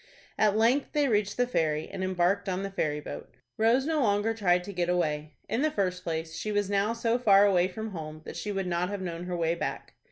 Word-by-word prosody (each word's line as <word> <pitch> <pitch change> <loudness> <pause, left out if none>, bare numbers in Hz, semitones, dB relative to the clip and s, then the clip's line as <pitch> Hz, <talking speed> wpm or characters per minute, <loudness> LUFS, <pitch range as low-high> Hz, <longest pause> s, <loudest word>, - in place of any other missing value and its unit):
At 210 -1 +3
length 240 +6 +2
they 295 -1 +2
reached 205 -4 +1
the 245 - +3
ferry, 155 -10 0
and 190 - -5
embarked 185 +2 +1
on 185 +1 -2
the 195 - -4
ferry 150 -6 -1
boat. 150 - -9 0.2
Rose 235 +4 +3
no 315 -1 +1
longer 210 -1 +2
tried 180 -5 +2
to 200 +2 -7
get 175 -1 -1
away. 155 -4 -1
In 240 - -1
the 310 - +3
first 185 -8 -1
place, 160 -1 -3
she 215 +6 -3
was 205 -1 0
now 200 +3 +2
so 230 +1 0
far 205 -4 +6
away 185 -3 +3
from 220 +4 -6
home 155 -3 -7
that - - -7
she 210 - -4
would 195 -1 -2
not 180 0 -1
have 200 -2 -4
known 170 -1 -5
her 180 -1 -3
way 165 -1 +1
back. 170 - -4
195 Hz, 235 wpm, -28 LUFS, 175-220 Hz, 0.2 s, far